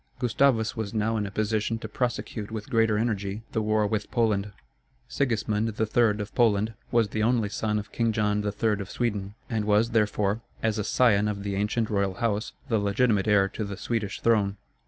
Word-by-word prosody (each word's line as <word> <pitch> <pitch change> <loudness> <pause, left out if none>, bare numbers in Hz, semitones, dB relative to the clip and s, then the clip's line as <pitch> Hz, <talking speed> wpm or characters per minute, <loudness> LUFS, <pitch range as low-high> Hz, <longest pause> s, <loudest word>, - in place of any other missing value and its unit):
Gustavus 120 -3 +2
was 110 -1 -4
now 110 +1 +1
in 105 -2 -1
a - - -5
position 110 +1 0
to - - -7
prosecute 120 -4 -3
with 110 +3 -6
greater 115 -3 +3
energy 105 -2 -2
the 110 - 0
war 110 0 +2
with 105 0 -2
Poland. 105 -4 +1 0.6
Sigismund 110 -4 -1
III., 110 -1 +2
of 105 0 -5
Poland, 110 -2 +2 0.2
was 115 -3 +3
the 110 +1 -2
only 115 -2 +2
son 105 +1 -1
of 105 - -5
King 115 -1 +1
John 105 -1 0
III., 105 0 0
of 95 - -7
Sweden, 105 -4 -2
and 110 -2 -1
was, 105 +3 +3
therefore, 105 -1 +1 0.2
as 110 -1 +1
a - - 0
scion 105 -2 +3
of 100 -1 -3
the 100 -1 -2
ancient 105 +3 0
royal 100 -2 0
house, 110 -2 -1 0.2
the 110 -3 +1
legitimate 100 0 +2
heir 100 -2 +4
to 110 - -4
the 100 -2 -5
Swedish 110 -4 -3
throne. 105 -4 +2
110 Hz, 190 wpm, -26 LUFS, 105-115 Hz, 0.6 s, heir